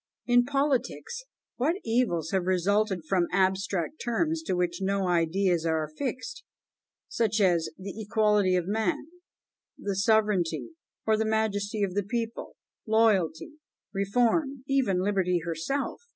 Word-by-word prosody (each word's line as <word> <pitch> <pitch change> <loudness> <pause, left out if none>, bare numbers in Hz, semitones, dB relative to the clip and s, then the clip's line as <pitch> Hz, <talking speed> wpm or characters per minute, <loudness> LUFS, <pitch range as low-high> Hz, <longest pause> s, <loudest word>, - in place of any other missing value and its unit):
In 245 0 +4
politics, 285 - -1 0.3
what 295 +8 +1
evils 225 -9 0
have 190 -2 0
resulted 190 0 +1
from 175 -1 +2
abstract 190 - 0
terms 315 +7 0
to - - +1
which 180 0 -1
no 195 0 0
ideas 175 0 +2
are 160 -1 +1
affixed, 255 - -5 0.6
such 225 -2 0
as, 175 -5 +3
"The 190 +1 -7
Equality 210 -3 +2
of 180 -2 0
Man 215 0 0 0.7
the 200 -1 -3
Sovereignty 205 - +2 0.4
or 220 -1 +3
the 220 - 0
Majesty 215 -1 0
of 190 -2 -1
the 205 - +1
People 230 +3 -4 0.3
Loyalty 215 - +2 0.4
Reform 245 - +1
even 245 -10 +1
Liberty 185 -3 +1
herself! 170 - -2
205 Hz, 125 wpm, -28 LUFS, 180-235 Hz, 0.7 s, In